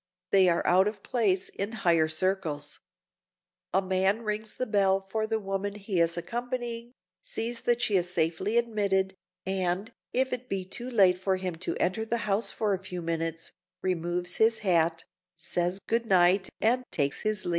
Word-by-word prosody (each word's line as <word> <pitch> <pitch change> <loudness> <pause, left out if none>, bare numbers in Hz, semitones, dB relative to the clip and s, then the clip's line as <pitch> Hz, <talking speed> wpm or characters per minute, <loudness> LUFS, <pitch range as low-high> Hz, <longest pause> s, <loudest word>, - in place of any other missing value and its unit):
They 190 -2 +6
are 170 - +1
out 185 +3 +5
of 210 -2 -4
place 200 -6 +1
in 200 +3 -4
higher 170 -7 +3
circles. 155 -3 -1 0.9
A 190 +2 +2
man 190 +4 +1
rings 215 0 -3
the 255 - -2
bell 195 -3 +3
for 215 +3 -3
the 220 0 0
woman 195 0 -3
he 200 -3 -2
is 170 0 +1
accompanying, 240 +4 -4 0.3
sees 240 - -3
that 240 0 +1
she 210 - +2
is 180 0 0
safely 180 +6 0
admitted, 200 -5 +1 0.3
and, 190 +3 -1 0.2
if 260 +1 +1
it 250 0 -5
be 190 -2 -2
too 240 +6 -5
late 190 -6 +4
for 190 0 +1
him 185 -1 -3
to 175 - -2
enter 190 +5 0
the 230 0 -2
house 205 +2 +1
for 210 -2 0
a 190 - -1
few 180 -2 -6
minutes, 165 0 -3 0.3
removes 180 0 -1
his 225 0 +4
hat, 170 -5 +2 0.3
says 175 +3 -1
good 230 0 0
night 185 0 +4
and 245 +3 +2
takes 140 -2 -1
his 215 -2 -1
leave. - - -1
195 Hz, 175 wpm, -28 LUFS, 180-220 Hz, 0.9 s, They